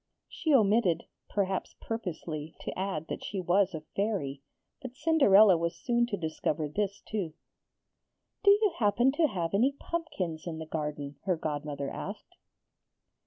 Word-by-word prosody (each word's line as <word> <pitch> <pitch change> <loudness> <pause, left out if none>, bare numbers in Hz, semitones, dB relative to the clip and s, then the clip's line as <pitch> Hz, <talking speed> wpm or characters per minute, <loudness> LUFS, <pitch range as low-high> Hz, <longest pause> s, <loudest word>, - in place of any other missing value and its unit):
She 325 -1 -2
omitted, 210 - +4 0.3
perhaps 195 -2 -1
purposely, 165 -8 -5
to - - -5
add 185 -5 -2
that - - -5
she 195 - -3
was 185 +1 +2
a 155 - -5
Fairy; 185 -10 -1 0.4
but 255 -1 -8
Cinderella 220 - +6
was 170 0 -1
soon 240 -1 +1
to 205 -4 -2
discover 160 -2 -1
this 200 +6 -2
too. 190 -7 -3 1.1
'Do 405 - +6
you 410 -1 +5
happen 240 +4 +4
to 315 +3 +3
have 175 - -3
any 245 +8 +3
pumpkins 185 - -3
in 165 -2 -4
the 160 - -5
garden?' 150 -2 -4
her 185 -3 +1
godmother 145 -2 -3
asked. - - -7
190 Hz, 145 wpm, -30 LUFS, 160-230 Hz, 1.1 s, Cinderella